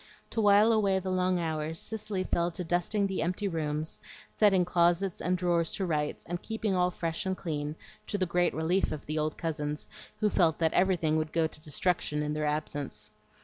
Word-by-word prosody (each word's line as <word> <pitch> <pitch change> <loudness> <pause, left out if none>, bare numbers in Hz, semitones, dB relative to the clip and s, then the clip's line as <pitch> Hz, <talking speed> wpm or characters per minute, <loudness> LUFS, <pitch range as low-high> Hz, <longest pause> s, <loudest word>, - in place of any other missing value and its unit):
To 225 - 0
wile 205 +2 +6
away 200 -4 +3
the 190 0 -2
long 185 0 +1
hours, 160 -1 -2
Cicely 210 -3 -3
fell 170 -1 0
to 175 +1 -4
dusting 175 +4 0
the 195 -1 -1
empty 180 +5 -1
rooms, 155 -3 -2 0.4
setting 195 -4 +4
closets 175 +1 +2
and 180 +1 +1
drawers 170 -2 +1
to 195 - 0
rights, 150 -3 -2
and 175 +1 -3
keeping 220 -2 -2
all 180 -1 +3
fresh 165 -1 -2
and 190 0 -1
clean, 150 -3 -3 0.3
to 205 - -1
the 185 - +1
great 175 0 +1
relief 170 +4 +1
of 155 -2 -5
the 155 +1 -2
old 155 0 -1
cousins, 150 -3 -3 0.3
who 210 -1 +2
felt 165 -4 +3
that 160 -1 +1
everything 175 -4 +2
would 155 0 -1
go 165 -1 +2
to 155 -1 -6
destruction 150 -1 0
in 150 0 -2
their 150 0 -1
absence. 150 -5 -3
175 Hz, 195 wpm, -29 LUFS, 155-190 Hz, 0.4 s, wile